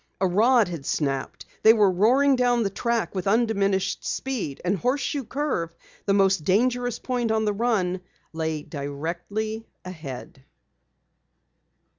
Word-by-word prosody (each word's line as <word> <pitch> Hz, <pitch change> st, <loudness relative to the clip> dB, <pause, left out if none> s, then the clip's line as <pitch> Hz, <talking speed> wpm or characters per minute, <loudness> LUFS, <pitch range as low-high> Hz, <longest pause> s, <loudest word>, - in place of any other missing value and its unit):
A 190 Hz, -, +2 dB
rod 220 Hz, +5 st, +4 dB
had 170 Hz, -5 st, -6 dB
snapped! 135 Hz, -1 st, -2 dB, 0.2 s
They 220 Hz, -, +8 dB
were 210 Hz, -4 st, +4 dB
roaring 255 Hz, +9 st, +4 dB
down 245 Hz, -2 st, +2 dB
the 195 Hz, -, -1 dB
track 235 Hz, +2 st, -1 dB
with 185 Hz, -1 st, -3 dB
undiminished 200 Hz, -3 st, +1 dB
speed, 240 Hz, -, -3 dB
and 185 Hz, +3 st, +2 dB
Horseshoe 270 Hz, +5 st, -1 dB
Curve, 235 Hz, -, -2 dB, 0.3 s
the 200 Hz, -, +3 dB
most 195 Hz, -4 st, +3 dB
dangerous 245 Hz, +6 st, +1 dB
point 245 Hz, -3 st, -2 dB
on 220 Hz, 0 st, +1 dB
the 210 Hz, -, +1 dB
run, 200 Hz, -5 st, 0 dB, 0.3 s
lay 160 Hz, -2 st, -2 dB
directly 170 Hz, +11 st, -4 dB, 0.2 s
ahead. 140 Hz, -7 st, -8 dB
200 Hz, 130 wpm, -25 LUFS, 175-240 Hz, 0.3 s, They